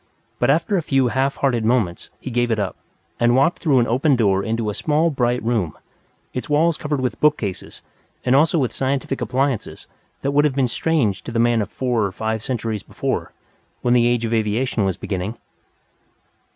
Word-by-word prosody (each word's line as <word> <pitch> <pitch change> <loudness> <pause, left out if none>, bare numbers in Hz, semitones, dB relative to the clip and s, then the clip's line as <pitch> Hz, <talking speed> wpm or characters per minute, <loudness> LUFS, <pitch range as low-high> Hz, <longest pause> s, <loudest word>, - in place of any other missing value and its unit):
But - - +2
after 170 +8 +2
a - - +1
few 135 -5 +2
half 135 +3 0
hearted 125 -5 0
movements, 110 -7 0
he 130 - -6
gave 120 0 +1
it 110 - +1
up, 100 -3 -2 0.4
and 120 0 +4
walked 140 +6 +3
through 145 -6 +2
an 120 - +4
open 135 +5 +2
door 100 -5 +2
into 110 -1 -1
a - - -6
small 155 +7 +1
bright 125 -4 0
room, 110 -9 -1 0.6
its 125 - -5
walls 160 +3 +3
covered 150 -2 -2
with 125 -3 -2
bookcases 130 -11 -1 0.4
and 125 +1 +4
also 155 +4 +4
with 130 -7 +1
scientific 135 0 -2
appliances 130 +1 -1 0.4
that 140 - +1
would 145 +1 +4
have 140 -3 +1
been 135 -2 +2
strange 120 -6 0
to - - -7
the 115 - -2
man 115 -1 +3
of 100 - -3
four 125 -4 0
or 100 - -1
five 110 +3 -2
centuries 115 -4 -3
before, - - -3 0.5
when 120 - +3
the 120 -1 +4
Age 120 -1 +1
of 115 - -2
Aviation 110 0 0
was 95 -2 -1
beginning. 100 +3 -4
120 Hz, 190 wpm, -21 LUFS, 110-135 Hz, 0.6 s, and